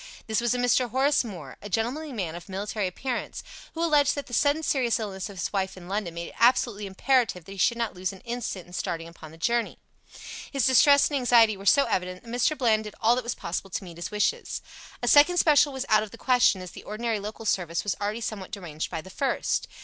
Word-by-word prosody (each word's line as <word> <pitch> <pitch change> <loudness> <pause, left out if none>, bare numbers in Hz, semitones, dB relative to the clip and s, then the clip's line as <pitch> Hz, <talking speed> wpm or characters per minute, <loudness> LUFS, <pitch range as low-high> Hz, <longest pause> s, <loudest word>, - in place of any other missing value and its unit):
This 220 0 0
was 240 0 +1
a - - -1
Mr. 245 0 +2
Horace 270 +5 +2
Moore, 175 - -9
a 205 - -8
gentlemanly 250 +10 -2
man 185 -10 -3
of 175 +3 -10
military 200 +1 -2
appearance, 245 +7 -4 0.3
who 330 - -1
alleged 295 -4 +3
that 285 - -4
the 250 - -12
sudden 290 +5 +2
serious 250 -5 +1
illness 200 -2 -5
of 200 - -11
his 175 - -3
wife 190 -1 -1
in 175 -1 -11
London 190 -3 -3
made 170 0 -5
it - - -16
absolutely 230 -3 +3
imperative 200 -3 +1
that 195 - -11
he 195 - -9
should 235 +4 +3
not 230 -2 -2
lose 185 +1 -3
an 195 - -13
instant 235 -6 -5
in 175 - -16
starting 165 -2 -3
upon 165 -2 -12
the 160 - -14
journey. 235 +7 0 0.7
His 275 -5 +1
distress 280 +2 +6
and 290 - -1
anxiety 235 -3 +5
were 195 +1 -8
so 280 +5 +6
evident 185 -4 -2
that 235 - -13
Mr. 245 +6 +1
Bland 220 -4 +2
did 210 - -8
all 230 +1 +4
that 250 - -2
was 235 +1 -3
possible 185 +3 -4
to 195 - -4
meet 170 -3 -11
his 170 - -5
wishes. 445 - -1 0.4
A - - 0
second 300 +5 +6
special 295 -3 +5
was 265 0 -4
out 215 -1 +4
of 215 - -5
the 230 - -12
question, 245 -8 +3
as 180 - -9
the - - -10
ordinary 220 +1 -2
local 215 +2 -7
service 170 -5 0
was 205 - -1
already 210 +3 -2
somewhat 205 -4 -5
deranged 175 -7 -5
by 165 -2 -4
the 190 - -13
first. 275 +7 -1
220 Hz, 240 wpm, -26 LUFS, 190-250 Hz, 0.7 s, distress